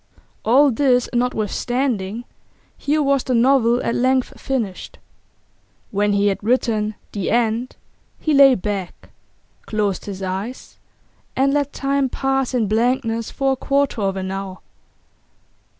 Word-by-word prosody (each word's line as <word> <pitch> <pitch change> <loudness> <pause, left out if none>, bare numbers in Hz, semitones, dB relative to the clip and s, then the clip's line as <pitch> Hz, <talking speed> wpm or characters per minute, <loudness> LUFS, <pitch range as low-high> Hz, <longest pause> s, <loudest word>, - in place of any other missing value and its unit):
All 270 +5 +5
this 250 0 +2
notwithstanding, 240 -2 -1 0.5
here 300 +1 0
was 275 -2 +2
the 255 - 0
novel 245 -1 +3
at - - 0
length 255 +1 0
finished. 230 -9 -3 0.9
When 205 0 +1
he 200 0 +2
had 200 0 0
written 220 -2 0 0.2
'The 200 -3 -3
End' 235 +1 0 0.4
he 310 - 0
lay 275 -2 +7
back, 195 -2 -5 0.6
closed 205 -3 -1
his 195 -1 -6
eyes, 195 +7 -5 0.6
and 275 +1 +2
let 285 -1 0
time 275 -1 0
pass 270 0 -1
in 235 -3 +2
blankness 230 +1 0
for 270 -1 0
a - - +1
quarter 275 -3 0
of 195 -1 -1
an 190 0 -3
hour. 195 -1 -5
240 Hz, 130 wpm, -20 LUFS, 205-270 Hz, 0.9 s, lay